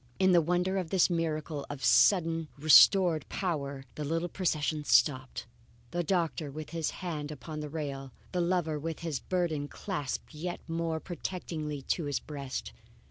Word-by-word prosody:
In 190 -1 +4
the 175 -1 +6
wonder 180 +3 +1
of 175 -3 -4
this 185 0 +3
miracle 155 -3 -2
of 145 -2 -6
suddenly 165 -4 +4
restored 160 +2 +7
power, 140 -7 -3
the 150 - -5
little 165 +4 -1
procession 155 -4 -1
stopped, 130 -3 +2 0.5
the 175 0 -1
doctor 165 -3 0
with 155 +2 -7
his 165 -2 -1 0.2
hand 150 -4 -3
upon 155 +2 -7
the 150 -1 -5
rail, 140 -3 -5 0.2
the 180 - 0
lover 170 -3 0
with 165 +2 -5
his 160 -5 -2
burden 170 -6 -1
clasped 150 -4 -4
yet 175 +3 -4
more 165 -1 -1
protectingly 160 -5 -5
to 165 +4 -1
his 145 -2 -1
breast. 140 - -6
160 Hz, 155 wpm, -30 LUFS, 150-175 Hz, 0.5 s, restored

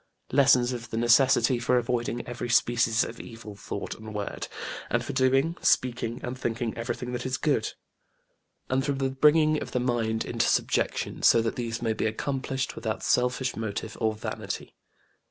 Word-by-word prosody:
Lessons 130 -2 +4
of 120 -2 -6
the 115 - -4
necessity 120 +1 +4
for 125 +1 +2
avoiding 120 0 -1
every 120 0 -5
species 115 -1 +3
of 115 - -7
evil 115 -3 -9
thought 100 - -5
and 110 -1 -10
word, 105 -1 -4 0.4
and - - 0
for - - -4
doing, 135 +5 +2
speaking 120 -2 +1
and 125 +1 -3
thinking 115 -2 -2
everything 120 +1 -4
that 120 0 -3
is 130 0 -1
good, - - 0 0.9
and 130 +1 +1
for 140 - 0
the 135 -1 -1
bringing 155 +3 +4
of - - -7
the 125 - +1
mind 115 -3 0
into - - 0
subjection - - 0
so - - +6
that 115 - -1
these 115 -1 -3
may 115 -1 +1
be 110 - -1
accomplished 135 +3 -2
without 110 -2 -3
selfish 125 +1 +1
motive 110 0 -4
or 110 -1 +1
vanity. 105 - -5
120 Hz, 170 wpm, -27 LUFS, 115-130 Hz, 0.9 s, so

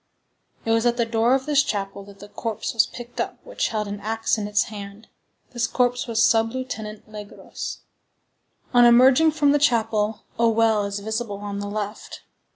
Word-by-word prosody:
It 225 - 0
was 225 +1 +3
at 240 0 +1
the 235 - +2
door 230 +2 +2
of 265 -1 -2
this 295 -1 +4
chapel 200 -5 -3
that 200 0 -14
the 205 - -11
corpse 220 0 -4
was 225 -2 +3
picked 240 0 -7
up - - -4
which - - -2
held 215 -2 -2
an 200 0 -5
axe 225 +2 -1
in 210 -2 -3
its 210 0 +2
hand; 205 0 -10 0.4
this 240 -1 -1
corpse 245 0 0
was 225 -1 +2
Sub 225 0 +3
Lieutenant 220 -5 -6
Legros. 210 -1 -8 0.9
On 245 0 +6
emerging 255 +6 +6
from 300 -2 +2
the 290 - +3
chapel, 220 -6 +1 0.2
a 230 0 +4
well 220 -2 +2
is 200 0 -3
visible 220 0 -3
on 200 0 -5
the 205 - -4
left. 210 0 -6
225 Hz, 185 wpm, -23 LUFS, 210-240 Hz, 0.9 s, On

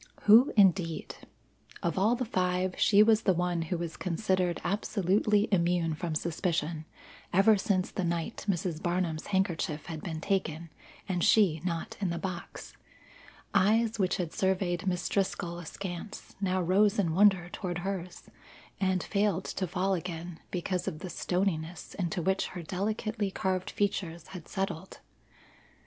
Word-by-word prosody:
Who 225 +6 +7
indeed! 180 -4 +3 0.7
Of 170 - 0
all 210 +5 +3
the 250 +1 -2
five, 185 -3 0
she 205 0 +6
was 220 0 +4
the 190 - +2
one 175 -1 0
who 165 +2 -2
was 165 -1 -5
considered 185 -1 0
absolutely 205 +1 +1
immune 170 -3 +2
from 160 +1 -3
suspicion 165 -1 -1 0.5
ever 195 +4 +5
since 190 -2 0
the 190 - -2
night 170 +6 -3
Mrs. 170 -3 -1
Barnum's 175 -3 -1
handkerchief 175 -6 -1
had 160 -3 -6
been 160 -3 -4
taken, 165 -3 -2 0.4
and 180 -3 -1
she 180 -8 +4
not 170 -3 -3
in 190 - +1
the 170 - -2
box. 175 0 -6 0.8
Eyes 220 +3 +3
which 185 -2 +1
had 175 -3 -3
surveyed 190 -2 0
Miss 180 -1 0
Driscoll 190 -3 -1
askance 175 +3 -7
now 185 -1 +1
rose 195 +4 +3
in 175 -6 +1
wonder 190 -2 +4
toward 175 -1 -4
hers, 185 -2 -4 0.6
and 185 -2 +1
failed 200 -3 0
to 185 - -3
fall 185 +3 0
again 170 -1 -5
because 180 0 -2
of 175 -5 -2
the 185 -2 -6
stoniness 175 -2 -2
into 175 -2 -2
which 190 +3 +1
her 175 - -5
delicately 210 +4 -2
carved 185 -1 -1
features 175 -5 -2
had 180 -4 -9
settled. 195 -3 -4
185 Hz, 145 wpm, -30 LUFS, 170-195 Hz, 0.8 s, Who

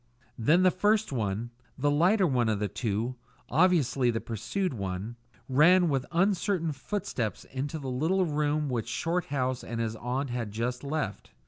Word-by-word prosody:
Then 160 +11 +4
the 185 - +6
first 210 +2 +2
one, 110 -1 -2 0.3
the 145 +2 +2
lighter 185 +7 +4
of 120 - +1
the 105 +1 -1
two, 115 +4 -2 0.3
obviously 145 -6 +3
the 115 -1 0
pursued 180 - -3
one, 100 +1 -4 0.3
ran 170 +6 +5
with 135 -3 0
uncertain 180 -1 +1
footsteps 130 - -3
into 140 +4 -3
the 140 -3 -6
little 160 +9 +1
room 150 -1 0
which 120 -4 -2
Shorthouse 135 -4 -1
and 115 0 -5
his 115 -1 -1
aunt 125 +3 -2
had 120 -3 -3
just 120 +4 -3
left. 140 -7 -3
135 Hz, 150 wpm, -28 LUFS, 115-170 Hz, 0.3 s, the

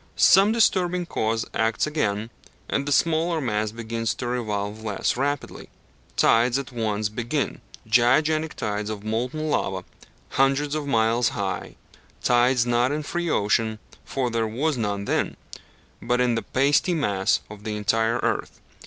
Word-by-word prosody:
Some 195 +3 +6
disturbing 180 -6 +2
cause 110 -7 -1
acts 110 +2 +1
again, 115 -8 -1 0.4
and 140 +1 -1
the - - -1
smaller 165 +3 +2
mass 110 -5 -1
begins 115 -1 -3
to 125 - -5
revolve 110 -3 -3
less 105 -2 -1
rapidly. 140 +2 -3 0.5
Tides 120 +2 +4
at 135 -2 -5
once 110 -3 -1
begin 120 +6 -3 0.2
gigantic 150 +8 +2
tides 105 0 -3
of 105 -2 -5
molten 125 +8 -2
lava 95 -9 -1 0.5
hundreds 135 +2 +1
of 150 -2 -2
miles 115 -1 +2
high; 95 -2 -3 0.5
tides 125 0 +3
not 120 +2 +2
in 150 +1 -2
free 175 +3 -2
ocean, 110 -1 +1 0.3
for 130 -3 -2
there 115 -1 0
was 140 +8 -1
none 100 -4 -2
then, - - -1 0.6
but 125 +1 0
in 125 -1 +3
the 115 - 0
pasty 145 +9 +2
mass 100 -11 +1
of 105 0 -11
the 105 -1 -3
entire 110 +3 +1
earth. - - -2
120 Hz, 145 wpm, -24 LUFS, 110-145 Hz, 0.6 s, Some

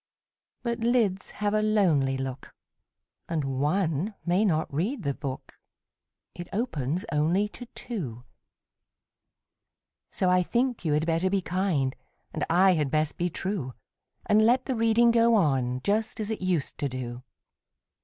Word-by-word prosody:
But 235 -1 -2
lids 225 -5 +1
have 205 0 -2
a 215 - +2
lonely 170 -11 +2
look, 135 0 -6 0.7
And 160 -3 -1
one 155 +7 0
may 180 +4 +2
not 160 -8 0
read 200 - -1
the 140 -1 0
book 135 -2 -7 0.7
It 175 0 -8
opens 175 - -2
only 165 +7 +2
to 245 +3 -10
two; 140 - -5 1.9
So 185 - 0
I 180 0 +4
think 240 +5 0
you 155 -3 +1
had 150 +2 +1
better 165 +3 +1
be 195 -1 0
kind, 170 -8 0 0.4
And - - -2
I 185 +3 +5
had 150 -5 0
best 155 +1 0
be 175 +1 +1
true, 170 -8 -3 0.5
And 215 +1 +4
let 250 +3 +3
the 260 - -1
reading 230 +1 +4
go 230 0 +4
on, 130 - +1
Just 215 +2 0
as 215 0 -2
it 220 - -4
used 180 -6 -1
to 140 - -1
do. 125 -1 -6
180 Hz, 145 wpm, -27 LUFS, 145-215 Hz, 1.9 s, I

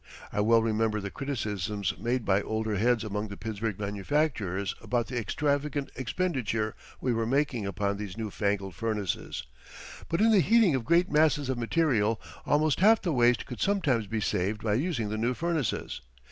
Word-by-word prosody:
I 105 - +1
well 115 +1 +4
remember 110 -1 +1
the 100 -1 -5
criticisms 105 -8 -2
made 120 +1 -1
by 100 +1 +3
older 110 +1 -2
heads 115 +3 +2
among 105 0 -3
the 100 -1 -8
Pittsburgh 110 -2 -3
manufacturers 100 - -1
about 120 -2 0
the 125 - -3
extravagant 145 +4 -1
expenditure 125 - -1 0.3
we 125 - 0
were 115 -1 0
making 130 -5 0
upon 100 0 -1
these 100 -2 -6
new 110 -2 -4
fangled 100 -2 -1
furnaces. 105 0 -3 0.7
But 165 - 0
in 225 +2 +5
the 210 - +6
heating 225 -4 +4
of 130 -4 -1
great 170 +5 +3
masses 150 -3 +3
of 130 -2 -1
material, 115 -5 +1 0.3
almost 150 0 +2
half 220 +4 +6
the 175 -5 0
waste 120 -2 +3
could 125 - -8
sometimes 145 - +1
be 110 +1 -2
saved 105 +2 -1
by 105 -2 +1
using 125 - 0
the 110 +1 -3
new 120 +3 0
furnaces. 165 -6 -2
115 Hz, 175 wpm, -28 LUFS, 105-145 Hz, 0.7 s, the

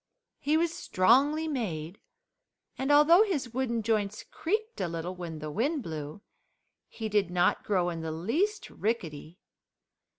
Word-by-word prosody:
He 300 +2 +2
was 335 0 +1
strongly 285 - +3
made, 190 - -3 0.8
and 270 +2 -1
although 300 +6 +7
his 300 - 0
wooden 235 -3 -1
joints 210 -2 0
creaked 435 +6 -3
a - - 0
little 170 +2 -4
when 175 -3 -6
the 155 0 -6
wind 275 - 0
blew 155 +1 -6 0.7
he 225 - -5
did 205 -3 +1
not 180 0 +2
grow 180 -4 +1
in 165 -1 -5
the 160 0 -3
least 320 - -1
rickety. 170 -7 -3
220 Hz, 140 wpm, -29 LUFS, -, 0.8 s, although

